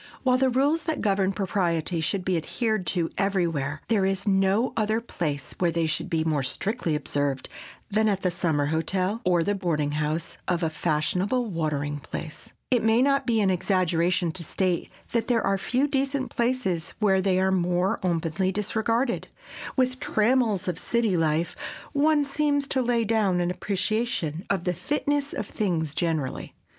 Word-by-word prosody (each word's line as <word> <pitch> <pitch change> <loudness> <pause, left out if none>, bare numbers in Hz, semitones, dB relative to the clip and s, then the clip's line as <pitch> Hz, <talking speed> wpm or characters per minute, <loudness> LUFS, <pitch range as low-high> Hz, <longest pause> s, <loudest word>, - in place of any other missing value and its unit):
While 255 -1 +3
the 265 0 +3
rules 285 +6 +2
that 320 -2 -1
govern 195 -2 +2
propriety 180 -4 0
should 185 +3 -1
be 185 - +1
adhered 215 +4 -1
to 170 -3 0
everywhere, 165 -7 0
there 215 -4 +2
is 195 +2 -1
no 195 +4 +2
other 220 0 +1
place 155 - -4
where 175 - +3
they 170 0 0
should 160 - -2
be 160 -1 +1
more 155 -3 +1
strictly 175 - -1
observed 145 -2 -2 0.4
than 215 +1 +3
at 195 -2 0
the 180 - +2
summer 160 -4 0
hotel, 185 +7 0
or 175 -2 +3
the 205 - +1
boarding 165 -7 -1
house 150 +2 -2
of 175 -1 0
a 160 - 0
fashionable 175 +10 0
watering 150 -6 -2
place. 155 +2 -7 0.2
It 245 -3 +4
may 225 +3 +4
not 275 -1 +2
be 225 -2 +3
an 195 -2 +3
exaggeration 180 -1 +1
to 170 +1 -4
state 180 +2 -1 0.2
that 230 -1 0
there 235 -3 +2
are 195 0 +1
few 255 +7 +1
decent 275 -1 -1
places 235 -9 -1
where 195 -3 +3
they 185 -1 +2
are 190 0 +2
more 180 0 +1
openly 175 +1 0
disregarded. 225 +5 0 0.5
With 255 -1 +3
the - - -9
trammels 220 -5 +1
of 180 -1 -2
city 230 -5 +1
life 165 0 +1 0.4
one 295 0 +3
seems 285 -1 0
to 265 - +1
lay 240 -1 +1
down 210 -5 +2
an 175 0 +1
appreciation 195 -3 -2
of 195 -3 0
the 180 - 0
fitness 290 - -1
of 215 - -3
things 170 -8 -1
generally. 155 -4 -2
190 Hz, 170 wpm, -26 LUFS, 165-230 Hz, 0.5 s, It